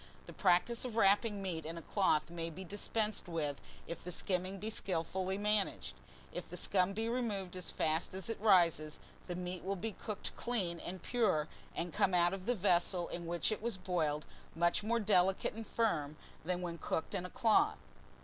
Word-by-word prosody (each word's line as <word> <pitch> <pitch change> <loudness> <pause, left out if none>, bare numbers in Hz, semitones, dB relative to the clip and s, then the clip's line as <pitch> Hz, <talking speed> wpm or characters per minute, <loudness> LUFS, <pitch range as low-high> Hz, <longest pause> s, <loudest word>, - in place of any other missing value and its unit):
The - - -10
practice 205 +7 +3
of 245 -3 -4
wrapping 205 -1 +3
meat 170 -4 -2
in 165 +2 -5
a - - -6
cloth 170 -6 +2
may 165 -1 -3
be 175 +4 -8
dispensed 210 +2 -2
with 150 -5 -2 0.2
if 170 - -7
the 180 - -5
skimming 185 +2 -1
be 215 +3 -3
skillfully 185 0 -1
managed. 210 -1 0 0.4
If - - -5
the - - -5
scum 185 0 +2
be 220 +3 -1
removed 210 -7 -2
as 180 -1 -3
fast 160 +3 0
as 190 - -4
it 225 -3 -3
rises, 170 -7 +4 0.3
the 175 - -3
meat 180 0 -4
will 195 +2 -1
be 220 +4 -3
cooked 210 +1 -4
clean 190 -9 0
and 180 +1 -6
pure, 215 -11 +2 0.3
and 170 0 -2
come 200 -3 +3
out 175 +1 +4
of 195 +1 -6
the 245 - +3
vessel 180 -2 +2
in 170 -1 -5
which 175 +5 +2
it 215 - -2
was 230 -3 -1
boiled, 160 -5 0 0.3
much 170 +3 +3
more 230 +3 +1
delicate 190 -3 +3
and 225 0 -7
firm 155 -11 0 0.3
than 180 +2 -2
when 170 -1 -4
cooked 160 - -2
in 190 -3 -1
a 180 - -5
cloth. 230 -2 +3
185 Hz, 190 wpm, -35 LUFS, 170-210 Hz, 0.4 s, rises